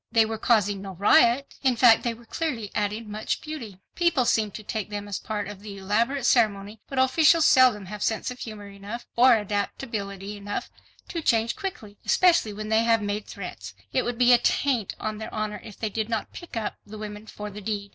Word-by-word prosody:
They 225 -1 +5
were 220 0 -4
causing 205 -5 +2
no 195 -1 -7
riot, 235 +8 +4
in 260 -3 +3
fact 235 -1 +6
they 235 -1 -2
were 235 +1 -17
clearly 235 -7 -3
adding 210 +1 -2
much 215 +1 -2
beauty—people 275 - -2
seemed 215 -3 +1
to 215 - -7
take 210 -1 -4
them 205 -1 -5
as 200 - -3
part 210 -2 -4
of 205 -2 -8
the 205 -1 -8
elaborate 230 +7 0
ceremony—but 215 +1 +1
officials 310 +5 +5
seldom 250 -6 +5
have 210 +2 -8
sense 220 +3 -1
of 250 - -9
humor 215 -3 -7
enough 200 +4 -8
or 245 +1 +7
adaptability 205 -1 -4
enough 205 0 -5 0.4
to 335 - -3
change 230 -5 +2
quickly, 220 - -7
especially 340 - +3
when 215 +1 -6
they 220 0 +4
have 230 -2 +3
made 205 +1 -3
threats. 100 - -8 0.2
It - - +2
would 240 -1 -3
be 245 0 +6
a 240 - +6
taint 245 -4 0
on 215 -1 -4
their 220 - -6
honor, 215 -1 -3
if 210 - -11
they 220 -2 -3
did 220 +1 -2
not 225 -2 -3
"pick 345 -9 -8
up" 215 -2 -3
the 215 +1 -10
women 210 0 -7
for 210 0 -7
the 210 +1 -9
deed. 200 -1 -3
215 Hz, 205 wpm, -26 LUFS, 205-240 Hz, 0.4 s, or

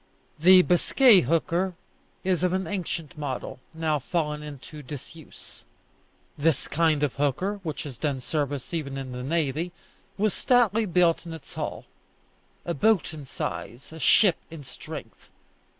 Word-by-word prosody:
The 180 +3 +8
Biscay 200 +5 +5
hooker 170 +5 0 0.5
is 185 -2 +1
of 180 0 +1
an 190 0 0
ancient 175 -4 -4
model, 135 -3 -4
now 160 -2 0
fallen 150 0 -2
into 150 +1 -9
disuse. 145 +3 -11 0.8
This 155 -1 +1
kind 155 -1 +2
of 145 - +1
hooker, 180 +9 0
which 160 -5 -4
has 135 -5 -8
done 145 -4 -1
service 145 +1 -3
even 140 -5 -3
in 135 -1 -5
the 125 0 -5
navy, 155 +3 -1 0.5
was 210 -1 +1
stoutly 225 -3 +3
built 175 -1 +2
in 165 - -6
its 160 -4 -11
hull - - -5 0.8
a 170 - -1
boat 195 +2 +2
in 150 -3 -8
size, 115 - -6
a 160 - -9
ship 185 +1 +5
in 160 -3 -9
strength. - - -10
160 Hz, 145 wpm, -26 LUFS, 145-180 Hz, 0.8 s, The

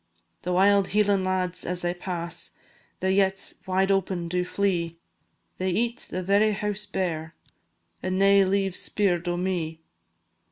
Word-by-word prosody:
The 180 - -3
wild 195 +1 +4
Hieland 205 -2 +3
lads 185 -1 -1
as 180 0 -3
they 175 0 0
pass, 175 -2 -4 0.5
The 190 0 +2
yetts 195 -1 0
wide 190 +1 +2
open 185 -3 0
do 180 +1 0
flee; 180 -3 -1 0.6
They 185 0 0
eat 235 +6 -1
the 185 +1 -3
very 205 +3 +3
house 210 +1 -3
bare, 165 -5 -3 0.7
And 185 0 -1
nae 195 0 +6
leave 195 -1 +1
's - - +2
speer'd 180 -4 +1
o' 175 0 0
me. 170 -3 -2
185 Hz, 150 wpm, -26 LUFS, 175-195 Hz, 0.7 s, nae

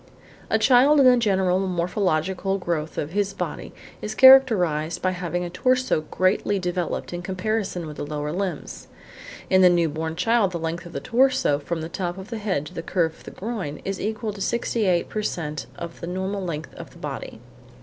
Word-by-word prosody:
A - - +3
child 275 +3 +5
in 275 - +6
the 250 -1 +8
general 190 -5 +2
morphological 185 0 0
growth 165 -4 -3
of 145 - -3
his 200 +1 -1
body - - -5 0.3
is 210 +1 -4
characterised 205 - +6
by 185 - 0
having 175 -1 -3
a 175 - -4
torso 255 -1 +1
greatly 185 +2 +1
developed 180 -1 -3
in 175 - -4
comparison 190 -1 -2
with 150 -2 -8
the - - -4
lower 150 0 -4
limbs. 180 -2 -4 0.6
In 185 0 +4
the 180 - +8
new 170 -1 +3
born 160 +2 -4
child 200 +1 +2
the - - -1
length 165 +2 -4
of - - -12
the - - -3
torso, 255 - +2
from 165 +3 -4
the 160 - -4
top 175 0 -4
of 190 +4 -9
the 230 - -3
head 190 -9 -1
to - - -10
the - - -4
curve 165 -1 0
of - - -19
the - - -7
groin, 190 -9 -5
is 195 0 -3
equal 215 0 -3
to 200 - -9
68 210 -6 0
per 215 - -3
cent 150 -8 -4
of 170 -1 -8
the 170 - -5
total 190 +2 -3
length 155 -3 -5
of - - -10
the - - -17
body. - - -6
185 Hz, 200 wpm, -24 LUFS, 170-210 Hz, 0.6 s, the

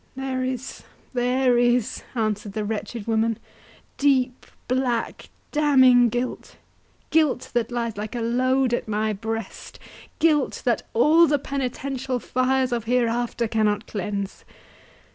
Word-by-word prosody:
"There 265 -1 -2
is—there 255 0 -1
is," 240 -2 +1
answered 210 -3 -2
the 215 0 -2
wretched 220 +1 -4
woman, 225 -1 +1 0.6
"deep, 260 -3 +1 0.2
black, 250 -2 -1 0.2
damning 260 -5 +5
guilt,—guilt, 255 +4 -3
that 240 -1 0
lies 235 -3 -2
like 215 +3 -5
a 240 - -2
load 255 +2 +1
at 240 - -1
my 215 0 0
breast—guilt, 225 +7 -3
that 240 -2 0
all 315 +8 +6
the 290 0 +2
penitential 270 -1 -3
fires 255 +1 0
of 235 -2 -2
hereafter 240 0 0
cannot 215 -1 0
cleanse. 200 -1 -4
245 Hz, 110 wpm, -24 LUFS, 225-260 Hz, 0.6 s, all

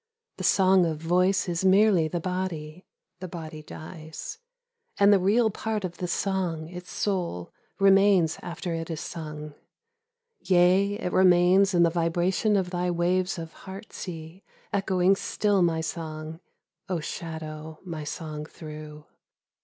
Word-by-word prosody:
The - - -5
song 190 -2 +4
of 160 -2 -2
voice 180 +5 +2
is 170 0 -1
merely 190 -3 +5
the 175 +2 -2
body, 180 -2 -4 0.3
(the 185 - -6
body 160 -3 -7
dies,) 160 - -9 0.6
And 200 +1 +6
the 200 - +5
real 220 +4 +3
part 215 -1 -3
of 175 -2 -6
the 180 - -3
song, 175 -4 -1
its 180 +1 -9
soul, 175 - -2 0.2
remains 195 -4 +4
after 175 0 -5
it 165 0 -4
is 160 -2 -3
sung: 150 -2 -7 0.9
Yea, 185 +2 +4
it 190 -4 -4
remains 185 +1 +5
in 170 - +5
the 170 - +3
vibration 175 +5 +1
of 185 -3 0
thy 180 0 -1
waves 180 +2 +1
of 165 -1 -7
heart 195 +3 -10
sea 165 +1 -8 0.3
Echoing 190 -1 +3
still 205 0 +1
my 165 -2 +2
song, 160 -1 -5 0.5
(O 180 -3 0
shadow 155 -1 -6
my 165 -4 -6
song 150 0 -6
threw 150 -1 -10
175 Hz, 140 wpm, -26 LUFS, 160-190 Hz, 0.9 s, And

